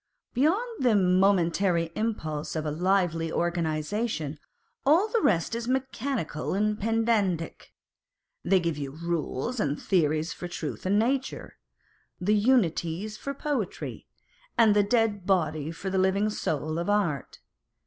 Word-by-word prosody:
Beyond 390 - +1
the 240 -4 +4
momentary 180 -2 +3
impulse 160 -10 -3
of 155 -1 -2
a 150 - -1
lively 170 -1 +1
organisation, 165 0 -1 0.4
all 330 +9 +4
the 460 0 +1
rest 170 - +2
is 235 0 -3
mechanical 260 - -2
and 210 +1 0
pedantic; 215 -6 0 0.7
they 190 +1 +4
give 165 -4 -2
you 140 -1 -3
rules 170 - -2
and 145 -5 0
theories 155 -3 +1
for 175 - -6
truth 175 0 -5
and 200 +2 +3
nature, 260 +4 -1 0.6
the 200 +4 +2
Unities 205 -4 +1
for 280 +5 -5
poetry, 275 - -3 0.5
and 220 -3 +5
the 205 - +6
dead 205 -3 +1
body 155 -6 +1
for 185 +4 -5
the 190 - +1
living 195 +3 +2
soul 155 -4 -2
of 175 - -2
art. 180 -10 0
190 Hz, 130 wpm, -27 LUFS, 165-225 Hz, 0.7 s, the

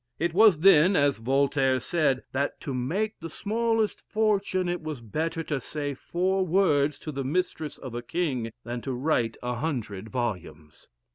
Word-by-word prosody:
It 170 0 -1
was 210 -2 +6
then, 185 0 +6
as 145 -5 +2
Voltaire 135 +1 +2
said, 135 -2 +1
"that 140 +2 -1
to 140 - -4
make 175 - -2
the 165 - -6
smallest 225 +4 0
fortune, 200 -4 +1
it 175 0 -2
was 155 -4 -5
better 160 - -3
to 150 -3 -2
say 145 +2 -4
four 185 +7 0
words 155 -6 +2
to 155 - -6
the 135 -1 -3
mistress 155 +1 -2
of 130 -3 -8
a 120 - -3
king, 130 -5 -2
than 120 +1 -5
to 135 - -3
write 125 -4 0
a 125 0 -1
hundred 115 -8 -3
volumes." 90 - -5
150 Hz, 165 wpm, -27 LUFS, 125-180 Hz, -, was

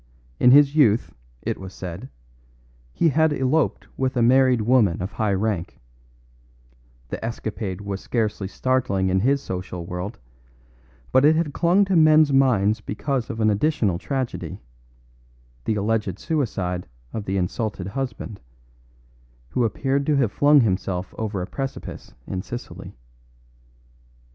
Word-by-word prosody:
In - - +6
his 140 +2 +6
youth, 120 -7 +3 0.3
it - - -2
was 95 0 -9
said, 95 +8 -7 0.8
he 165 - +2
had 160 +2 +3
eloped 140 +2 0
with 130 -1 -1
a 120 - +3
married 130 0 +4
woman 110 -6 +3
of 95 +2 -4
high 105 -2 0
rank; 100 -3 -2 1.3
the - - -5
escapade 110 -4 -4
was 100 -1 -5
scarcely 105 -4 -2
startling 100 -3 0
in 95 +1 +2
his 135 +6 +1
social 90 -1 -5
world, 90 +5 -5 0.9
but 130 - +4
it 155 +2 +6
had 155 -3 -1
clung 180 +6 +3
to 190 -1 0
men's 155 -2 +5
minds 110 -6 +3
because 125 +4 -3
of 115 - -5
an 110 -1 +3
additional 105 - +1
tragedy: 120 - -4 1.1
the 110 - 0
alleged 105 -2 -1
suicide 100 - -2 0.3
of 105 - -4
the 95 +1 -1
insulted 95 +1 -2
husband, 125 -3 -5 1.1
who 125 - 0
appeared 135 +5 0
to 150 - +3
have 130 -7 +2
flung 145 +2 +5
himself 95 -3 -1
over 105 -4 -2
a - - -3
precipice 135 +6 -6
in 95 - -4
Sicily. 120 +5 -8
115 Hz, 135 wpm, -23 LUFS, 95-135 Hz, 1.3 s, In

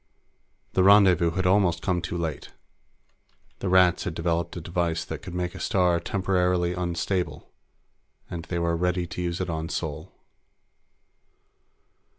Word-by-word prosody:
The 95 - +3
rendezvous 95 -4 +6
had 90 +3 -2
almost 90 -2 +2
come 90 -2 0
too 85 +1 -4
late. 80 -4 -4 1.1
The 95 - -2
Rats 90 -1 +4
had - - -4
developed 85 +1 -1
a - - -3
device 85 -1 -2
that - - -6
could 90 - -8
make 90 0 -2
a - - -9
star 90 -2 +2
temporarily 90 -2 0
unstable, 90 +1 -3 0.8
and 85 -1 -6
they 85 - -3
were 85 -1 0
ready 90 +1 0
to 90 - -6
use 85 0 -2
it 95 - -2
on 80 0 -3
Sol. 80 -5 -4
90 Hz, 145 wpm, -26 LUFS, 85-90 Hz, 1.1 s, rendezvous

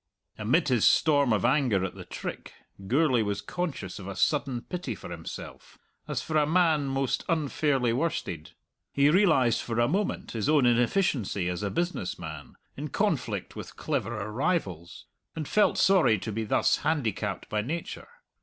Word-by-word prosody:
Amid 135 +9 +2
his 120 -4 +4
storm 145 -5 +4
of 110 0 +2
anger 120 -8 +2
at 95 - -5
the - - -10
trick, - - -7 0.3
Gourlay 130 0 +3
was 105 -1 -1
conscious 140 - -4
of 95 - -8
a 100 - -5
sudden 135 -1 0
pity 180 -1 -5
for - - -10
himself, 85 -1 -9 0.3
as - - -2
for 155 - -1
a 150 -1 +3
man 160 -4 +3
most 135 -1 -1
unfairly 145 -6 +1
worsted. 120 - -3 0.4
He 140 +1 +4
realized 155 - +4
for 115 -1 -3
a 120 - +4
moment 195 +6 -1
his 115 +3 -2
own 150 -4 +4
inefficiency 120 - +1
as 90 +1 -3
a 100 - -1
business 170 - -2
man, 80 -3 -8 0.2
in - - -5
conflict - - -1
with - - -8
cleverer 105 +2 -3
rivals, 105 - -2 0.3
and 155 -3 -4
felt 210 - +3
sorry 185 - +4
to 110 - -5
be 110 +1 -3
thus - - +2
handicapped 115 - -2
by 105 - -1
nature. 160 +9 -5
130 Hz, 165 wpm, -28 LUFS, 105-155 Hz, 0.4 s, his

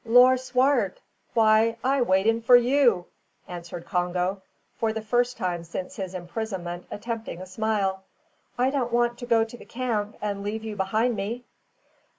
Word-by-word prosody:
"Lor', 245 +3 +7
Swart! 260 - +1 0.4
why 225 0 +4
I 270 +1 +2
waiting 225 +2 +3
for 245 +2 +7
you," 245 -6 +4 0.4
answered 175 -1 -7
Congo, 180 +2 -1 0.4
for 225 -1 +1
the 220 - -3
first 245 +3 +1
time 175 -2 -2
since 170 +2 -6
his 190 -2 -5
imprisonment 180 -1 -5
attempting 225 -4 -5
a 185 - -7
smile; 195 -1 -1 0.6
"I 255 +2 +2
don't 255 -4 -1
want 240 0 +1
to 245 - -7
go 230 -2 +4
to 225 +2 -8
the - - -11
camp 230 -4 -3
and 205 -1 -3
leave 215 +2 -4
you 220 -1 -5
behind 220 +5 +1
me." 225 +5 -4
220 Hz, 160 wpm, -26 LUFS, 190-240 Hz, 0.6 s, Lor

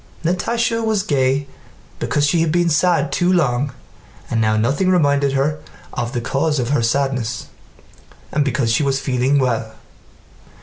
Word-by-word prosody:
Natásha 230 +6 0
was 215 -3 +1
gay 135 0 +1 0.5
because 145 - +1
she 165 +3 +2
had 165 -2 +1
been 175 +1 +2
sad 155 -3 +2
too 175 +5 +1
long 140 -6 +1 0.6
and 115 - +1
now 110 0 +2
nothing 140 - +1
reminded 145 -6 +2
her 145 +3 0 0.3
of 120 0 -3
the 120 - -1
cause 145 +5 0
of 125 -2 -1
her 145 -3 +2
sadness, 125 -1 -1 0.8
and 150 - +1
because 130 -4 0
she 115 - +2
was 135 -1 +1
feeling 130 +1 +1
well. 115 -4 0
140 Hz, 150 wpm, -19 LUFS, 125-165 Hz, 0.8 s, she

